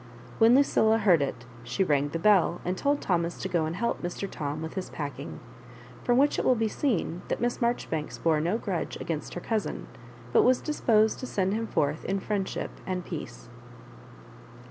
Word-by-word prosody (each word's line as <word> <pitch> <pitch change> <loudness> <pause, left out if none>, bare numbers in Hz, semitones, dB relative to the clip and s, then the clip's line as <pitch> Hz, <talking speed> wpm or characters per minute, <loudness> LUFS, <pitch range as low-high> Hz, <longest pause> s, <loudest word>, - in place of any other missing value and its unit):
When 230 +2 +7
Lucilla 225 -5 +4
heard 190 -8 +4
it, 135 -4 -3 0.2
she 125 +10 0
rang 145 -4 +1
the 165 - -3
bell, 180 -1 +4
and 180 +1 0
told 285 +8 0
Thomas 170 -2 0
to - - -2
go 175 -4 +1
and 160 +2 -3
help 235 +5 -1
Mr. 175 +3 -4
Tom 150 -3 -4
with 160 - -5
his 190 -1 -4
packing; 145 -2 -6 0.6
from 245 0 +3
which 285 +2 +3
it - - 0
will 255 - +4
be 225 -1 +1
seen 205 - -1
that - - -2
Miss 240 0 -1
Maijoribanks 235 - -1
bore 160 -2 +3
no 175 +7 +1
grudge 190 -7 -3
against 155 -3 -4
her 175 - -4
cousin, 220 0 -2 0.5
but - - +6
was 255 +1 +4
disposed 220 -8 +2
to 255 - -5
send 190 -3 0
him 225 +1 -2
forth 145 -3 0
in 195 +1 0
friendship 195 -1 -2 0.2
and 180 -2 -2
peace. 150 -10 -7
185 Hz, 190 wpm, -28 LUFS, 160-225 Hz, 0.6 s, When